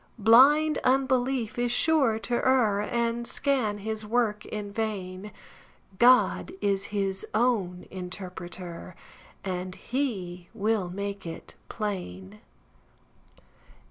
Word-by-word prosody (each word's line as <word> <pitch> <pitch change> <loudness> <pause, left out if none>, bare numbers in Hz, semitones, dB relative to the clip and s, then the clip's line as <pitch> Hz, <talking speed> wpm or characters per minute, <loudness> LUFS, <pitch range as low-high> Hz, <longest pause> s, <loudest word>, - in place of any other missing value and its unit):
Blind 275 +8 +6
unbelief 260 -3 +1
is 245 0 +1
sure 270 -4 +3
to 225 +2 -5
err, 240 -5 +3
And 235 +1 -1
scan 255 -7 0
his 220 +1 -4
work 215 -1 0
in 205 -1 -6
vain; 205 -2 -4 0.7
God 250 +7 +4
is 195 -1 0
his 195 -2 -1
own 210 -7 0
interpreter, 180 -1 -8 0.5
And 185 -1 -4
he 190 -10 -4
will 210 -3 0
make 200 0 -5
it 165 - -8 0.2
plain. 105 - -5
210 Hz, 100 wpm, -27 LUFS, 185-240 Hz, 0.7 s, Blind